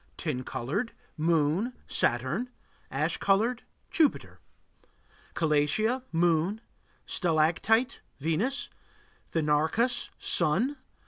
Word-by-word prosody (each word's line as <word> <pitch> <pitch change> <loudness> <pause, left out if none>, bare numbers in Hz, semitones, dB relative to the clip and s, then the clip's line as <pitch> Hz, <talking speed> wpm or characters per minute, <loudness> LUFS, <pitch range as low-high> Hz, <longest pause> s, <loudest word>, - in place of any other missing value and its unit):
Tin 125 - -2
colored 135 - -3 0.2
Moon, 165 - +1
Saturn. 130 - 0 0.4
Ash - - -1
colored 225 +5 +2 0.3
Jupiter. 315 -4 +1 1.0
Calatia 165 - +2
Moon. 170 +4 +2 0.5
Stalactite 175 +8 +1 0.2
Venus. 170 - -1 0.6
Thenarcus 160 +11 +1
Sun. 195 - +2
170 Hz, 70 wpm, -28 LUFS, 155-230 Hz, 1.0 s, colored